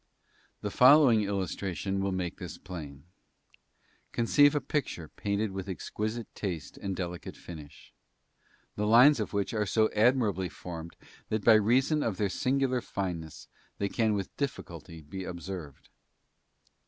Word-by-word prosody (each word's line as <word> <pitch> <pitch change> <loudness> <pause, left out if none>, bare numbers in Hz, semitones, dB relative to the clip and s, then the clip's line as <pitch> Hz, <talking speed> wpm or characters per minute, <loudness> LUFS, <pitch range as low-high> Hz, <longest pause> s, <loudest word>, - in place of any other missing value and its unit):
The - - -3
following 130 -4 +7
illustration 95 0 -2
will 100 0 0
make 90 -2 -3
this - - -7
plain: 75 -6 -8 1.1
conceive 145 +5 +4
a - - +3
picture 125 - -3
painted 100 +1 -2
with 95 0 -5
exquisite 110 +5 -4
taste 90 -7 -5
and 95 -1 -4
delicate 90 -1 -5
finish, 75 -4 -11 0.8
the 105 0 -1
lines 125 +5 +7
of 105 - -2
which 100 0 -1
are 105 -2 0
so 110 +2 +2
admirably 105 -5 +2
formed 85 -1 -8 0.3
that 110 -1 -2
by 115 - +8
reason 125 +8 +3
of 110 -8 -1
their 100 0 +1
singular 130 +4 0
fineness 85 -8 -5 0.3
they 100 - -1
can 110 -1 +1
with 100 -2 -4
difficulty 85 - -5
be 95 +6 -7
observed. 90 -4 -7
100 Hz, 135 wpm, -29 LUFS, 90-115 Hz, 1.1 s, by